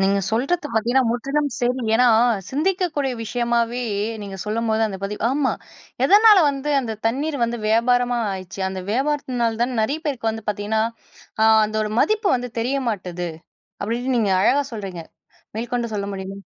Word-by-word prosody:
நீங்க 195 Hz, +1 st, +3 dB
சொல்றது 285 Hz, +8 st, 0 dB
பார்த்தீங்கன்னா 240 Hz, +4 st, +2 dB
முற்றிலும் 275 Hz, +5 st, -1 dB
சரி. 250 Hz, +1 st, 0 dB
ஏன்னா, 250 Hz, +2 st, +5 dB, 0.4 s
சிந்திக்கக்கூடிய 310 Hz, -3 st, 0 dB
விஷயமாவே 235 Hz, +1 st, 0 dB, 0.4 s
நீங்க 195 Hz, -1 st, -7 dB
சொல்லும்போது 220 Hz, +1 st, 0 dB
அந்த 195 Hz, -2 st, -6 dB
பதிவு 210 Hz, +1 st, -5 dB
ஆமா 275 Hz, -1 st, +1 dB, 0.5 s
எதனால 420 Hz, +1 st, +7 dB
வந்து 280 Hz, +1 st, -4 dB
அந்த 225 Hz, -4 st, -4 dB
தண்ணீர் 285 Hz, +5 st, -1 dB
வந்து 235 Hz, 0 st, -3 dB
வியாபாரமா 245 Hz, +2 st, +2 dB
ஆயிருச்சு? 190 Hz, +1 st, -7 dB
அந்த 190 Hz, 0 st, -5 dB
வியாபாரத்தினால 250 Hz, -3 st, 0 dB
தான் 245 Hz, 0 st, -1 dB
நிறைய 285 Hz, +8 st, -1 dB
பேருக்கு 235 Hz, -6 st, -1 dB
வந்து 225 Hz, -1 st, -7 dB
பார்த்தீங்கன்னா 210 Hz, +2 st, 0 dB, 0.6 s
ஆ -, -, +6 dB, 0.2 s
அந்த 215 Hz, -, -8 dB
ஒரு 210 Hz, -, -3 dB
மதிப்பு 430 Hz, -2 st, +2 dB
வந்து 245 Hz, 0 st, -5 dB
தெரிய 260 Hz, +4 st, 0 dB
மாட்டுது. 180 Hz, -4 st, -3 dB, 0.5 s
அப்பிடின்னு 245 Hz, +4 st, -1 dB
நீங்க 205 Hz, -4 st, +1 dB
அழகா 285 Hz, +6 st, +3 dB
சொல்றீங்க! 190 Hz, -6 st, -6 dB, 0.5 s
மேற்கொண்டு 235 Hz, 0 st, -2 dB
சொல்ல 200 Hz, 0 st, -2 dB
முடியுமா? 195 Hz, +1 st, -6 dB
235 Hz, 150 wpm, -22 LUFS, 215-270 Hz, 0.6 s, எதனால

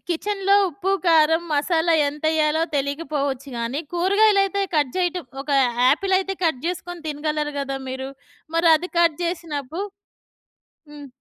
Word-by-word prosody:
కిచెన్‌లో 395 Hz, +3 st, +1 dB
ఉప్పు, 370 Hz, +4 st, -3 dB, 0.2 s
కారం, 320 Hz, 0 st, +4 dB
మసాలా 325 Hz, +3 st, +2 dB
ఎంతెయ్యాలో 310 Hz, +1 st, 0 dB
తెలియకపోవచ్చు 280 Hz, -1 st, -2 dB
గానీ, 235 Hz, +5 st, -2 dB
కూరగాయలయితే 395 Hz, +2 st, +3 dB
కట్ 290 Hz, -4 st, +2 dB
చేయటం. 360 Hz, -2 st, -1 dB, 0.2 s
ఒక 290 Hz, -, -7 dB, 0.4 s
ఆపిలయితే 385 Hz, +3 st, +1 dB
కట్ 310 Hz, -5 st, 0 dB
జెసుకొని 350 Hz, -1 st, -5 dB
తినగలరు 300 Hz, 0 st, -2 dB
గదా 275 Hz, -1 st, -3 dB
మీరు? 265 Hz, +1 st, -5 dB, 0.5 s
మరి 330 Hz, 0 st, +3 dB
అది 360 Hz, +3 st, -6 dB
కట్ 335 Hz, -3 st, +3 dB
చేసినప్పు 330 Hz, -3 st, -4 dB, 1.1 s
హ్మ్. 290 Hz, -1 st, -10 dB
320 Hz, 120 wpm, -22 LUFS, 290-360 Hz, 1.1 s, కారం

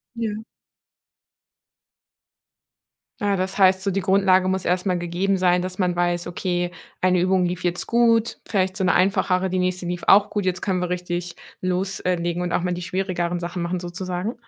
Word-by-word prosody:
Ja. 220 Hz, -2 st, -3 dB, 2.8 s
Ah, 205 Hz, -3 st, 0 dB
das 190 Hz, +1 st, -2 dB
heißt 190 Hz, -1 st, +5 dB
so, 200 Hz, -, 0 dB
die 195 Hz, +1 st, 0 dB
Grundlage 190 Hz, -1 st, +3 dB
muss 190 Hz, -1 st, -1 dB
erst 180 Hz, +2 st, 0 dB
mal 180 Hz, -2 st, +1 dB
gegeben 175 Hz, +3 st, 0 dB
sein, 180 Hz, -1 st, +3 dB
dass 185 Hz, +1 st, -5 dB
man 180 Hz, -2 st, +1 dB
weiß: 175 Hz, 0 st, 0 dB
Okay, 175 Hz, 0 st, -2 dB, 0.3 s
eine 180 Hz, -1 st, +3 dB
Übung 185 Hz, 0 st, +2 dB
lief 180 Hz, 0 st, -3 dB
jetzt 175 Hz, 0 st, -1 dB
gut, 230 Hz, -1 st, +2 dB
vielleicht 190 Hz, -3 st, 0 dB
so 190 Hz, -, 0 dB
'ne 180 Hz, -, +3 dB
einfachere, 185 Hz, 0 st, +2 dB
die 185 Hz, -, 0 dB
nächste 185 Hz, 0 st, -1 dB
lief 175 Hz, 0 st, -4 dB
auch 205 Hz, +1 st, +6 dB
gut. 205 Hz, -2 st, -2 dB
Jetzt 185 Hz, 0 st, -1 dB
können 185 Hz, -2 st, 0 dB
wir 180 Hz, -, -1 dB
richtig 175 Hz, -1 st, -3 dB, 0.2 s
los 185 Hz, +1 st, -1 dB
äh, 185 Hz, -, +1 dB
legen 170 Hz, 0 st, -2 dB
und 175 Hz, -, -2 dB
auch -, -, +1 dB
mal 180 Hz, 0 st, -1 dB
die 175 Hz, -, -5 dB
schwierigeren 180 Hz, -1 st, -2 dB
Sachen 175 Hz, +1 st, -4 dB
machen 175 Hz, +1 st, -2 dB
sozusagen? 180 Hz, +4 st, -4 dB
185 Hz, 185 wpm, -23 LUFS, 175-190 Hz, 2.8 s, auch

